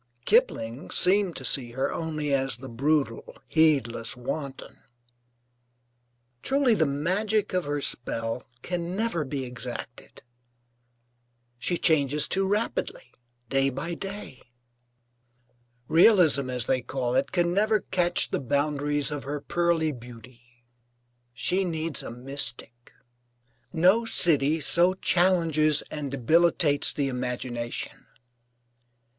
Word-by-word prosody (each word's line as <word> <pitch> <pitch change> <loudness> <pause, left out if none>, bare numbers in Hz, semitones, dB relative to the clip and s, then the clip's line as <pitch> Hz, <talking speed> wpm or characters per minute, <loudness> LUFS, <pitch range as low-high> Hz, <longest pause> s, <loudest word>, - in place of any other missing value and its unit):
Kipling 140 - +1
seemed 185 -1 +2
to - - -6
see 120 -4 0
her 130 +2 -2
only 155 -3 -3
as 135 -3 0
the 130 +2 -10
brutal, 135 0 -1
heedless 135 -8 +1
wanton.) 135 +2 -6 1.6
Truly 270 -3 +2
the 160 -8 +2
magic 190 +9 -1
of 180 -1 0
her 145 0 -2
spell 115 -2 -2 0.2
can 175 0 -4
never 210 -7 -1
be 135 -1 -4
exacted. 125 -1 -7 1.4
She 175 +8 0
changes 150 -2 +2
too 195 0 0
rapidly, 460 - -3 0.4
day 135 +2 +2
by 135 +6 -5
day. 195 -7 -8 1.5
Realism, 165 - +5
as 125 -2 -2
they 130 0 0
call 125 -1 -3
it, - - 0
can 175 -1 +1
never 215 +1 +2
catch 175 -1 0
the - - -1
boundaries 145 +2 -1
of 145 -2 -5
her 145 +1 -4
pearly 170 0 0
beauty. 120 -1 -13 0.9
She 180 +10 0
needs 165 -3 -1
a - - -7
mystic. 120 -1 -2 0.8
No 185 +8 +3
city 160 -7 +3
so 175 +5 +4
challenges 165 -5 +2
and 150 -2 -4
debilitates 145 +2 +2
the 140 -2 -1
imagination. 125 -2 -5
150 Hz, 110 wpm, -26 LUFS, 130-175 Hz, 1.6 s, Realism